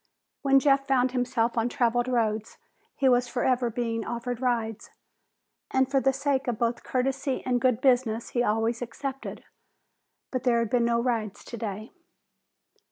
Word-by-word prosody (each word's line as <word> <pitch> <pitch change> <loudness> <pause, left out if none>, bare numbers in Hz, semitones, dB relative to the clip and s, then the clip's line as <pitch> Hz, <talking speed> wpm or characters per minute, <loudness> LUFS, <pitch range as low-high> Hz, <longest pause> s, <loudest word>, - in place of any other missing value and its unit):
When 275 -1 +4
Jeff 275 -1 +3
found 255 -1 +2
himself 245 -2 0
on 230 +2 0
traveled 240 0 +1
roads, 220 -3 -1 0.4
he 275 - +2
was 245 -1 +4
forever 245 0 +1
being 230 -1 -2
offered 240 +1 -4
rides, 230 -4 -1 0.8
and 265 0 +1
for 270 -1 +3
the 270 - +3
sake 270 0 -1
of 240 -3 -1
both 235 +1 0
courtesy 265 +1 -1
and 250 -2 +1
good 250 -2 +2
business 245 -4 +2
he 240 - 0
always 225 +1 0
accepted. 270 +3 -6 0.9
But 255 - -1
there 245 -2 +3
had 230 -2 0
been 240 -2 +3
no 235 0 +2
rides 230 -4 -2
today. 215 -2 -6
245 Hz, 155 wpm, -27 LUFS, 230-260 Hz, 0.9 s, When